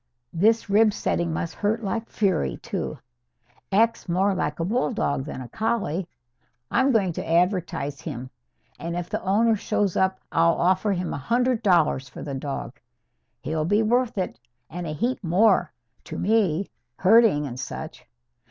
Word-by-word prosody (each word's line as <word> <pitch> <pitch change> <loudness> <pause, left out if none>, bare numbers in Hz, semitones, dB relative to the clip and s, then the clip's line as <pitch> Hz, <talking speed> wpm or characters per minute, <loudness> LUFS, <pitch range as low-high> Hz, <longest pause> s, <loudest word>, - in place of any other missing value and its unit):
This 220 +7 +3
rib 210 +1 +4
setting 170 -4 -1
must 165 +1 -3
hurt 220 +3 -1
like 225 +3 -3
fury, 190 -6 0
too. 195 -8 -4 0.7
Acts 225 0 +2
more 190 +3 +2
like 150 -4 -2
a 165 - 0
bulldog 210 - 0
than 150 - -6
a - - -9
collie. 195 - -1 0.6
I'm 265 +3 +3
going 195 -7 +2
to - - -5
advertise 170 -5 0
him. 130 -4 -6 0.5
And 170 +1 -4
if 175 0 -4
the - - -2
owner 220 +4 +3
shows 200 -2 -1
up, 190 0 +1
I'll 165 0 +3
offer 185 +4 +2
him 180 -1 -3
a - - -3
hundred 245 - +1
dollars 165 - +2
for - - -9
the 145 - -5
dog. 135 +1 -5 0.6
He'll 155 0 -2
be 205 +6 +2
worth 240 +1 +1
it, 185 -8 -3 0.3
and 175 +1 -5
a - - -3
heap 240 - -2
more, 180 0 +3 0.3
to - - -6
me, 200 -4 +1 0.3
herding 195 -6 +5
and 125 -2 -6
such. 125 - -7
190 Hz, 160 wpm, -25 LUFS, 165-220 Hz, 0.7 s, herding